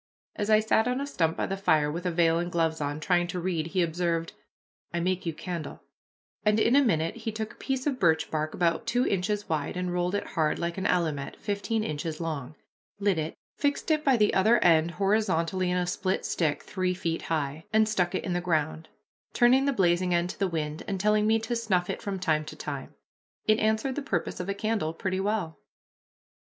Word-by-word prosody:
As 205 0 -2
I 215 0 +6
sat 220 +1 +2
on 250 +1 0
a 280 - -2
stump 165 - 0
by - - 0
the 195 - -2
fire 155 -6 +2
with 175 +4 -3
a - - +1
veil 165 -1 +3
and 175 0 -3
gloves 165 -2 0
on, 145 +1 -2
trying 175 +1 +2
to 180 +1 -3
read, 170 -3 -1
he 180 +1 +1
observed, 165 0 -1 0.6
"I 170 - -1
make 180 0 -1
you - - +1
candle," 170 0 -6 0.6
and 210 0 +3
in 235 +4 +4
a 285 - +6
minute 165 - +1
he 225 -1 -4
took 220 0 -4
a - - -23
piece 265 -1 -2
of 275 -4 -1
birch 160 -5 +2
bark 155 0 -2
about 170 +5 +1
two 245 +2 +2
inches 205 +2 -1
wide 155 +2 -2
and 180 -1 -2
rolled 180 +2 0
it 205 - -1
hard, 155 -3 0
like 170 +2 -3
an 190 - 0
allumette 155 -6 0
fifteen 210 +2 -2
inches 155 -2 -4
long, 155 -4 -4 0.4
lit 200 -4 +2
it, 155 +1 -3 0.2
fixed 285 +2 0
it 305 -1 +2
by 270 -4 +4
the 210 -2 +3
other 220 +5 +5
end 165 -1 +5
horizontally 185 -2 +1
in 180 - +1
a 180 - +1
split 185 +2 -1
stick 150 -4 0
three 185 -2 -1
feet 165 -2 -2
high, 155 -1 -2
and 220 0 +4
stuck 180 -5 0
it - - -2
in 185 - -2
the 175 - 0
ground, 160 -2 -1 0.4
turning 255 +2 +5
the 280 - +3
blazing 180 -5 +2
end 175 +1 0
to - - -14
the 195 - +2
wind, 155 -3 -3
and 195 -2 -2
telling 210 +2 +3
me 220 +1 +4
to 225 +2 -3
snuff 195 -6 0
it - - -6
from 200 -1 -3
time 160 -5 +1
to 155 - -9
time. - - -6 0.5
It 215 0 +4
answered 220 +5 +1
the 290 - -3
purpose 195 - -2
of 180 +2 -4
a 200 - -1
candle 210 -7 -1
pretty 185 +2 -2
well. 195 -5 -2
180 Hz, 220 wpm, -28 LUFS, 165-215 Hz, 0.6 s, I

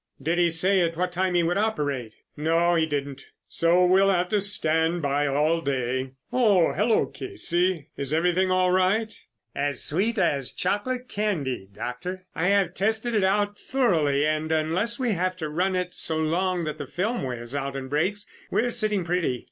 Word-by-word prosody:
"Did 165 +6 -1
he 175 -1 +4
say 185 +4 +2
at 165 -1 0
what 180 +1 -1
time 180 0 0
he 175 - +3
would 175 +4 +1
operate?" 145 - -2 0.2
"No, 165 +3 +2
he 165 -2 +2
didn't, 140 -2 -4 0.2
so 175 +2 +3
we'll 190 +2 +4
have 180 -2 +1
to 210 -2 +1
stand 165 -4 +1
by 145 +1 +1
all 150 +4 +1
day. 130 -2 -2 0.2
Oh, 210 -9 +3
hello, 215 +3 +2
Casey, 180 - -1
is 140 0 -4
everything 180 +4 +2
all 185 0 +2
right?" 195 +4 +1 0.4
"As 140 -2 -1
sweet 210 +9 +1
as 145 -8 0
chocolate 245 +7 -2
candy, 145 - -2
Doctor. 180 - -6
I 165 - -1
have 195 -3 +2
tested 220 +5 0
it 210 -3 +2
out 205 +2 +1
thoroughly, 160 - +1
and 155 +1 -1
unless 165 +9 0
we 250 -3 0
have 185 -1 -1
to 155 -4 -4
run 185 +5 0
it 180 -1 -2
so 160 - -1
long 175 +3 0
that 155 -1 -4
the 145 - -5
film 220 - -2
wears 120 -1 -5
out 140 -1 -3
and 135 -1 -5
breaks, 180 +9 -1 0.2
we - - +1
are 245 - -1
sitting 215 -5 0
pretty. 170 -8 0
175 Hz, 180 wpm, -25 LUFS, 150-195 Hz, 0.4 s, he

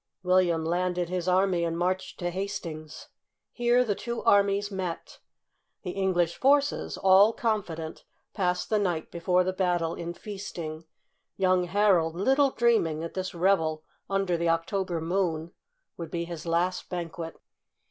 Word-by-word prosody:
William 180 -3 +2
landed 175 +1 0
his 180 -1 -2
army 185 -1 +2
and 165 0 -1
marched 185 +2 -1
to 175 -1 -2
Hastings. 170 -5 -6 0.4
Here 240 0 +3
the 210 - +1
two 235 +3 -5
armies 200 0 +3
met. 185 -3 -5 0.6
The 180 - -3
English 180 -3 0
forces, 285 +1 +2
all 195 +3 +6
confident, 185 -10 -3 0.3
passed 180 -2 -1
the 215 - +3
night 175 -6 -1
before 180 +1 +2
the 185 +1 -1
battle 175 -3 0
in 170 0 -5
feasting, 170 -6 -7 0.5
young 185 -1 +3
Harold 180 -4 +2
little 270 +9 +3
dreaming 230 -12 +2
that 165 - -5
this 185 -1 -4
reve] 170 -3 +2 0.3
under 195 -3 +1
the 170 0 0
October 170 +1 -1
moon 170 -2 -1 0.5
would 170 -2 -6
be 170 +1 -3
his 170 -1 -7
last 175 +2 0
banquet. 170 -2 -5
180 Hz, 140 wpm, -27 LUFS, 170-195 Hz, 0.6 s, all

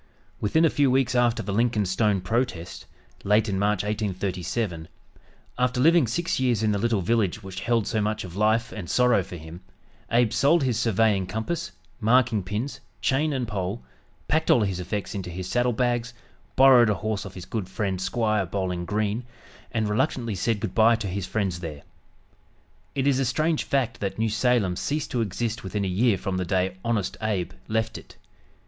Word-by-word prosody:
Within 160 +11 +3
a 160 - +3
few 145 -2 +3
weeks 130 0 +2
after 120 -1 +2
the 100 - -3
Lincoln 115 -1 +2
Stone 95 +1 +1
protest, 95 -3 -2 0.4
late 105 +2 +3
in 95 -2 -1
March, 105 -1 +1
1837, 95 -3 -2 0.7
after 125 0 +1
living 165 0 +5
six 150 +9 -1
years 120 -4 +1
in 110 - +2
the 100 - 0
little 115 -2 +1
village 110 0 0
which 95 -1 -7
held 115 +2 +1
so 110 0 0
much 105 +1 -1
of 90 -2 -9
life 110 +3 +2
and 95 -6 -7
sorrow 125 -4 +4
for 90 - -8
him, 80 +2 -10 0.5
Abe 115 -1 +3
sold 145 +3 +3
his 120 -4 0
surveying 110 -4 +2
compass, 110 - -3 0.3
marking 115 -1 +3
pins, 105 +8 -4 0.2
chain 150 +4 +1
and 130 -4 -2
pole, 100 +1 -3 0.4
packed 160 +1 +1
all 120 - +6
his 95 -3 -1
effects 95 +4 -4
into 95 -3 -5
his 90 +1 -5
saddle 125 +4 +1
bags, 120 0 -1 0.4
borrowed 130 -4 +7
a 105 - +2
horse 110 -1 -3
of 95 -2 -9
his 90 -1 -8
good 100 -4 -4
friend 95 -1 -2
"Squire" 105 0 0
Bowling 90 -1 -2
Green, 105 +4 -1 0.5
and 110 -3 0
reluctantly 115 +1 0
said 105 +3 0
good 110 - -4
bye 115 +1 +5
to 115 -2 -5
his 95 0 -3
friends 95 -5 -1
there. 75 -4 -7 1.1
It 135 -1 0
is 140 -2 +3
a - - +2
strange 155 +6 0
fact 125 -4 0
that 100 -1 -3
New 110 0 +1
Salem 110 -4 +1
ceased 150 +1 -2
to 120 - 0
exist 110 +1 -2
within 100 +1 -2
a - - -1
year 100 +3 +2
from 95 -1 -3
the 90 - -1
day 95 0 0
"Honest 115 -5 -1
Abe" 95 -5 -1 0.2
left 110 +1 -1
it. - - -16
110 Hz, 185 wpm, -25 LUFS, 95-120 Hz, 1.1 s, borrowed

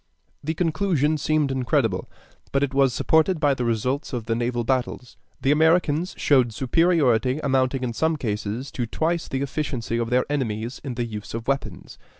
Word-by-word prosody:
The 160 +3 -2
conclusion 155 -3 +1
seemed 150 -2 +1
incredible, 125 -6 0 0.4
but 140 0 +1
it 140 -1 -1
was 135 -1 +4
supported 160 +6 +2
by 145 -2 +3
the 125 - -3
results 125 +6 -1
of 120 -3 -3
the 115 - 0
naval 120 +1 -1
battles. 125 0 -2 0.2
The 135 - +2
Americans 160 +2 +2
showed 130 -5 +3
superiority 135 -3 +2
amounting 130 -1 +1
in 120 -2 -2
some 160 +6 +1
cases 110 +1 -3
to 120 -2 -3
twice 165 +7 -1
the 135 +1 -2
efficiency 130 -5 -3
of 115 -1 -1
their 125 +1 +2
enemies 120 -4 -3
in 130 -4 -5
the 120 0 -1
use 105 -1 -7
of 115 0 -5
weapons. 140 0 -3
135 Hz, 170 wpm, -24 LUFS, 120-150 Hz, 0.4 s, was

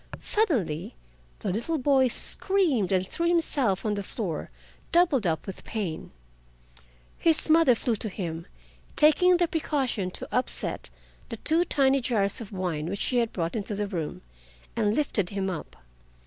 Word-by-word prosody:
Suddenly 225 - 0 0.5
the - - -1
little 235 - -1
boy 265 -1 +3
screamed 290 - +1
and 185 -1 +1
threw 340 +10 -1
himself 280 - +1
on 210 - +1
the 200 - -2
floor, 190 -5 -4 0.4
doubled 315 - +3
up 160 -1 -1
with 195 - -8
pain. 190 -8 -4 1.1
His 325 -1 +4
mother 315 -6 +6
flew 230 0 -1
to 215 - -4
him, 170 -4 -5 0.5
taking 355 +4 +6
the 345 -1 +2
precaution 275 - -1
to - - -8
upset 250 - 0 0.4
the 230 - -5
two 320 +9 +2
tiny 275 -3 +2
jars 215 -2 0
of 220 - -9
wine 175 -5 -3
which 195 +3 -4
she 250 - +1
had 230 -2 0
brought 170 +1 -3
into 205 -1 -3
the 205 +1 -1
room, 170 - -5 0.5
and 215 -2 +1
lifted 215 -11 0
him 195 -1 -2
up. 170 - -7
225 Hz, 155 wpm, -27 LUFS, 190-300 Hz, 1.1 s, mother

